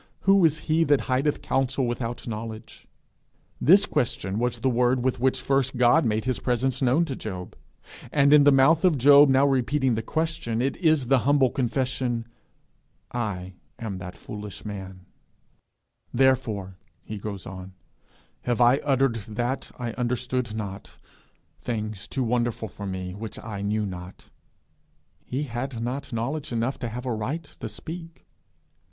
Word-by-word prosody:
Who 195 -1 +5
is 160 -1 +3
he 160 +1 +3
that 145 -3 +3
hideth 135 +3 0
counsel 135 0 0
without 120 0 -4
knowledge?' 110 0 -7 0.7
This - - +6
question 95 +3 -1
was 125 0 -1
the 135 - +1
word 125 +1 +2
with 130 -1 0
which 130 +1 +2
first 135 -1 0
God 125 +5 +5
made 110 -1 0
his 130 -1 -1
presence 130 +1 0
known 135 +6 +3
to 130 -7 -5
him; 90 0 -8 0.6
and 140 0 +4
in 150 -1 +8
the 145 - +7
mouth 140 +5 +5
of 175 -5 +4
Job 140 +2 +7
now 135 +1 +5
repeating 135 -1 +2
the 110 - -1
question, 160 -4 -2
it 135 +3 0
is 155 -6 +3
the 135 +1 +4
humble 135 +1 +3
confession, 125 -2 -1 0.9
'I 95 -6 -3 0.2
am 100 -5 -5
that 90 0 -8
foolish 105 -1 -8
man.' 95 -3 -7 1.1
'Therefore,' 115 -8 +1 0.2
he 105 -1 -6
goes 100 -2 -6
on, 95 -1 -8 0.7
'have 120 -1 -1
I 120 +2 +6
uttered 135 -4 +1 0.2
that 125 +2 -1
I 120 -2 -3
understood 125 -1 -2
not; 100 -3 -6 0.6
things 110 -3 -4
too 135 - -2
wonderful 120 -2 -1
for 100 +2 -7
me, 95 -1 -4
which 105 +2 -7
I 105 -3 -6
knew 105 +1 0
not.' 90 -1 -9 0.9
He 135 +4 -3
had 120 -1 -4
not 130 +4 -4
knowledge 135 +6 -3
enough 120 +3 -1
to 120 - -3
have 125 +3 -6
a 125 - -1
right 130 +10 -3
to 115 -6 -8
speak. 165 +8 -9
125 Hz, 155 wpm, -25 LUFS, 110-135 Hz, 1.1 s, in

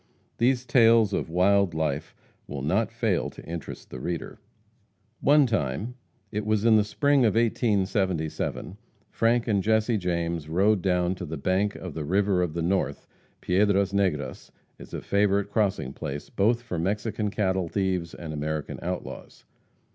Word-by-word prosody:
These 125 +1 +2
tales 115 -3 +5
of - - -1
wild 95 +1 +3
life 80 -2 -2 0.3
will 70 -1 -5
not 100 +9 +1
fail 115 -6 0
to - - -13
interest 85 -3 -7
the 65 - -6
reader. 85 +5 -5 0.8
One 145 0 +5
time 105 - -2 0.4
it 105 +1 -2
was 110 0 0
in 115 -1 +6
the 105 - +5
spring 140 +5 +2
of 110 -3 +3
1877 95 -6 0 0.3
Frank 120 +1 +2
and 100 -3 +2
Jesse 110 +2 +2
James 85 -3 -2
rode 95 +4 +3
down 90 -1 +1
to 90 -1 -6
the 80 +1 -5
bank 95 +7 0
of 90 -4 -7
the 80 - -4
"River 95 +3 +2
of 85 -3 -2
the 85 - -1
North." 85 -5 -1 0.4
Piedras 100 +1 +2
Negras 75 -10 -1 0.3
is - - -12
a - - -4
favorite 100 0 +1
crossing 100 - 0
place, 75 -2 -6
both 115 +4 +2
for 90 -8 -4
Mexican 105 +3 -1
cattle 95 -3 0
thieves 95 -4 -1
and 80 -2 -7
American 75 0 -3
outlaws. 90 +1 -6
95 Hz, 155 wpm, -26 LUFS, 85-110 Hz, 0.8 s, in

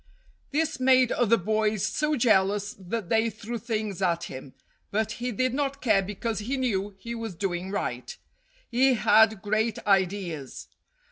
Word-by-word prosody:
This 305 0 -1
made 255 -1 +4
other 230 -1 +3
boys 215 +1 0
so 300 +6 0
jealous 205 -4 +2
that 190 0 -4
they 225 +1 +2
threw 225 +2 -6
things 215 -5 -3
at 170 -2 +1
him, 130 0 -8 0.3
but 220 +1 -1
he 250 0 -1
did 255 +3 0
not 275 0 -1
care 215 -7 +3
because 210 +3 -3
he 250 +6 -2
knew 205 -6 -1
he 235 +4 -7
was 225 -5 -5
doing 180 0 -3
right. 205 - -4 0.5
He 255 +2 +4
had 220 -2 +4
great 215 +1 0
ideas. 190 -7 -1
215 Hz, 150 wpm, -26 LUFS, 195-240 Hz, 0.5 s, made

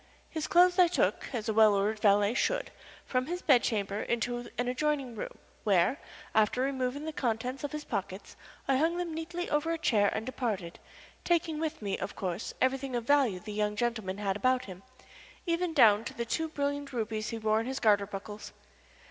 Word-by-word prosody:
His 315 -1 -3
clothes 360 0 +5
I 360 - +8
took, 340 - 0
as 235 -5 -3
a 220 - +1
well 215 -1 +6
ordered 210 +2 0
valet 205 +1 +4
should, - - 0 0.3
from 255 0 -1
his 355 +2 -4
bed 260 -5 +5
chamber 205 -2 -1
into 240 +1 -2
an 245 +1 -1
adjoining 270 -1 -1
room, 210 - -6 0.3
where, 200 - +3 0.3
after 220 +3 +3
removing 265 +1 -1
the 315 - -4
contents 250 +1 -2
of 290 - -3
his 300 -1 -5
pockets, 195 -4 -5 0.3
I 270 -1 +3
hung 325 +4 +1
them 350 -2 -3
neatly 340 +2 -4
over 295 +2 +1
a 330 - 0
chair 210 -10 +3
and 220 - -3
departed, 215 -9 -3 0.4
taking 330 -3 +1
with 320 -5 -3
me, 200 -1 -2
of - - -5
course, 185 +1 -3
everything 260 0 0
of 240 - -1
value 270 -9 +3
the 210 +2 -8
young 210 0 0
gentleman 220 -4 -2
had 200 -2 -1
about 255 +4 +1
him, 185 -1 -10 0.6
even 340 0 0
down 225 -8 +6
to - - -6
the 235 - -3
two 320 +7 -1
brilliant 285 -1 -2
rubies 220 -2 -2
he 230 - -4
wore 215 0 +1
in 225 - -3
his 265 0 -3
garter 205 -3 +3
buckles. 205 +1 -8
245 Hz, 195 wpm, -30 LUFS, 210-295 Hz, 0.6 s, I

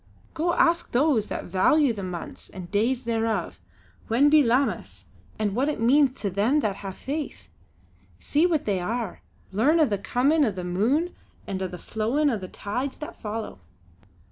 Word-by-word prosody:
Go 335 +2 0
ask 345 0 +2
those 250 -4 +3
that - - -4
value 240 - +3
the 205 - -6
months 180 -2 -7
and 180 -2 -9
days 235 +5 +1
thereof, 225 - -1 0.5
when 275 +6 +4
be 305 0 +7
Lammas 255 +2 0 0.3
and 210 -2 -1
what 270 +5 +1
it 300 - -3
means 265 +3 +3
to 200 - -1
them 225 +11 +2
that 200 -5 -1
hae 195 -1 -6
faith. 285 +9 -5 0.7
See 310 +4 +2
what 320 -5 0
they 200 -3 0
are; 220 +2 -3 0.3
learn 275 - +3
o' 310 - +6
the 205 -7 -1
comin' 280 +9 +2
o' 255 - +3
the 185 -3 -5
moon 235 - +1 0.3
and 190 -1 -4
o' 190 - -1
the 180 - -8
flowin' 235 - 0
o' 225 - 0
the 185 - -7
tides 250 +9 -4
that 300 - -7
follow!" 220 - -5
230 Hz, 175 wpm, -25 LUFS, 200-290 Hz, 0.7 s, be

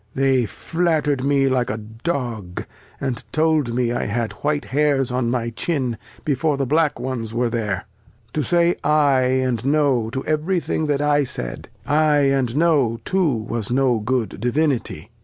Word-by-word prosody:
They 135 -3 +2
fiat 160 - 0
ter'd 140 -3 0
me 140 -1 +3
like 130 -2 +1
a 110 - -2
Dog, 115 - -4 0.3
and 130 -4 -3
told 155 -6 +1
me 120 -1 +1
I 120 - -1
had 115 +1 -1
white 150 0 0
Hairs 140 -2 +1
on 125 -1 0
my 120 -1 -1
Chin, 130 -1 -1 0.3
before 150 +1 +1
the 135 - 0
black 150 +1 +1
ones 120 -3 -4
were 120 0 +1
there; 105 -5 -2 0.5
to 155 - 0
say 170 +2 +2
ay 145 -3 +3 0.2
and 120 -3 -1
no 135 -5 +2
to 130 +3 -4
every 155 +4 0
Thing 160 -1 -2
that 145 -1 +1
I 145 0 +3
said: 60 - -5 0.2
Ay 145 -1 +3
and 130 -3 0
no 145 -8 +2
too 185 -5 +2
was 115 -2 -3
no 125 -2 +2
good 115 -2 -2
Divinity. 125 - -1
135 Hz, 165 wpm, -21 LUFS, 120-150 Hz, 0.5 s, me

